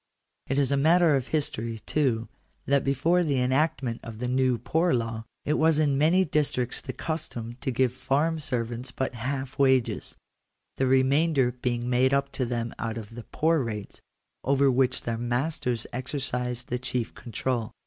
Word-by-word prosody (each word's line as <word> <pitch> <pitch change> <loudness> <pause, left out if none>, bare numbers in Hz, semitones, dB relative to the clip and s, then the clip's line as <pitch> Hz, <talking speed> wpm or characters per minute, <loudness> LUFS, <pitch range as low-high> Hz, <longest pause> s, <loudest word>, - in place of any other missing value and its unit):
It 135 - -1
is 140 -1 +2
matter 160 +2 +4
of 130 -2 -1
history, 115 -7 -2
too, 125 -7 +1 0.4
that 140 0 +2
before 165 +7 +2
the 140 -5 +1
enactment 130 -2 +1
of 115 -1 -8
the 125 +2 -3
New 130 -1 +2
Poor 160 - +1
Law, 115 -1 -3 0.2
it 150 - +1
was 160 -1 +4
in 150 -3 +2
many 165 +7 +4
districts 140 -6 0
the - - -5
custom 120 -8 -4
to - - -2
give 130 0 +1
farm 150 +5 0
servants 120 -2 -2
but 130 0 -2
half 130 +2 -4
wages; 130 -3 +2 0.6
the 135 - +2
remainder 135 +1 +3
being 120 -1 -2
made 130 +2 +3
up 140 0 0
to 130 - -2
them 115 -1 -2
out 115 0 -3
of 110 0 -8
the 120 -1 -9
poor 160 0 +1
rates, 105 -3 -6 0.4
over 140 0 +3
which 125 0 +1
their 115 -1 -2
masters 120 0 -1
exercised 125 -1 -3
the 125 - -1
chief 125 -2 -2
control. 120 0 -3
130 Hz, 165 wpm, -27 LUFS, 120-145 Hz, 0.6 s, matter